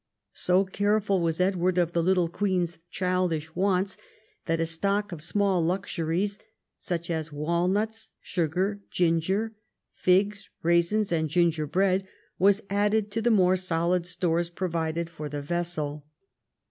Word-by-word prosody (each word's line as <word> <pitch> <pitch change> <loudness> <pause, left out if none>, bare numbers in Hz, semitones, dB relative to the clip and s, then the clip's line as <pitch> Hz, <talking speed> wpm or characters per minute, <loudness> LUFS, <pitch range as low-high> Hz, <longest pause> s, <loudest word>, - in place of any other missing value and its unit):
So 185 +2 +2
careful 200 0 +1
was 165 0 0
Edward 185 -1 +1
of 175 -2 +2
the 170 - +1
little 180 0 +2
queen's 175 -2 -1
childish 180 -4 -1
wants 190 0 +1 0.5
that 165 -1 +1
a 165 - +1
stock 200 +5 0
of 170 -3 -6
small 190 +1 +1
luxuries 185 +2 -1 0.2
— - - -58
such 170 -1 -2
as 160 -1 -3
walnuts, 180 +9 -1
sugar, 185 +4 -1
ginger, 180 +6 +1 0.4
figs, 200 +3 +1
raisins, 170 +5 +2
and 160 -2 +1
gingerbread 175 +4 +1 0.2
— - - -40
was 200 +3 +4
added 205 +1 +1
to 225 +2 -1
the 240 - +2
more 185 -4 +4
solid 175 -1 0
stores 175 -1 0
provided 170 -2 -2
for 155 -3 -7
the 145 0 -5
vessel. 150 -3 -2
180 Hz, 135 wpm, -27 LUFS, 165-195 Hz, 0.5 s, was